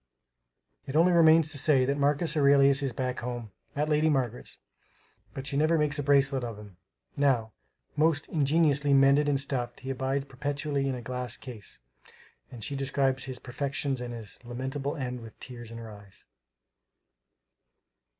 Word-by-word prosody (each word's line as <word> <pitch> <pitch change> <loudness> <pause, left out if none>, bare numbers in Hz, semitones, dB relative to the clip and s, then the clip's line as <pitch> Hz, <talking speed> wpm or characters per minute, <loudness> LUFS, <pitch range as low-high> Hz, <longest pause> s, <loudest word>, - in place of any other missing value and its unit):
It 135 - -5
only 170 +3 +5
remains 160 -2 +5
to 145 - -1
say 135 -3 +3
that 140 +2 0
Marcus 145 +3 +1
Aurelius 140 -1 +5
is 135 -2 -1
back 125 +1 -3
home, 120 -2 -5 0.2
at 150 +2 0
Lady 155 +1 +2
Margaret's; 125 -5 -2 0.8
but 135 - -5
she 140 - -3
never 155 +3 +3
makes 150 -1 0
a - - +1
bracelet 140 -2 +3
of 115 -3 -5
him, 105 -4 -13 0.4
now; 130 -6 +1 0.4
most 155 -1 +2
ingeniously 145 -2 +2
mended 140 +2 +5
and 140 -2 +1
stuffed, 135 -3 -3
he 130 +1 -4
abides 135 +1 -1
perpetually 140 +1 -2
in 130 - -1
a 120 - -7
glass 125 0 -4
case; 115 -7 -10 0.7
and 120 -3 -9
she 140 - -3
describes 135 -1 0
his 130 -1 -6
perfections 135 +1 -3
and 120 -1 -5
his 115 -1 -9
lamentable 135 +4 -4
end 125 -3 -4
with 115 -1 -12
tears 120 -3 -9
in 115 - -9
her 115 -1 -8
eyes. 100 -2 -15
135 Hz, 160 wpm, -28 LUFS, 125-145 Hz, 0.8 s, only